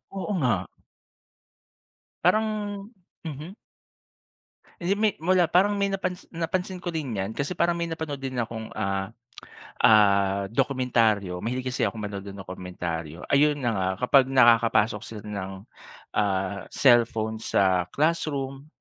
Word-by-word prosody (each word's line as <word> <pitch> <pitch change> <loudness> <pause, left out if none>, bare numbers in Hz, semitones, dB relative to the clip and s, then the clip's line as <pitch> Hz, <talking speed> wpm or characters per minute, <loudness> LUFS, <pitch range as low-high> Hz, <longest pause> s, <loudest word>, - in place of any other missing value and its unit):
Oo 195 +2 -3
nga. 125 -6 +3 1.7
Parang 215 +6 +4 0.8
mhm. 160 +5 -7 1.2
Hindi, 180 +3 0
may 210 +1 +2
mula 175 0 +2
parang 190 +4 +4
may 200 -1 0
napansi 185 -2 -4
napansin 180 +3 -3
ko 175 -1 -5
din 135 -9 -3
'yan 95 +3 -3
kasi 145 +9 -3
parang 175 - +2
may 170 0 -3
napanood 160 -4 -5
din 130 -2 -4
akong 115 -1 -4
ah, 95 0 -1 0.7
ah 100 -2 +4
dokumentaryo. 115 -7 +1
Mahilig 125 +6 -3
kasi 125 - 0
akong 110 - -4
manood 100 -1 -5
ng 100 -1 -8
dokumentaryo. 85 -3 -6
Ayun 145 +1 +4
na 120 - +1
nga, 95 -2 0
kapag 130 +1 +5
nakakapasok 115 -4 +4
sila 110 -2 -8
ng, 100 -2 -5 0.7
ah, 95 -1 -1
cellphone 115 -4 +3
sa 95 -4 +2
classroom, 140 -3 -1
125 Hz, 130 wpm, -26 LUFS, 100-160 Hz, 1.7 s, kapag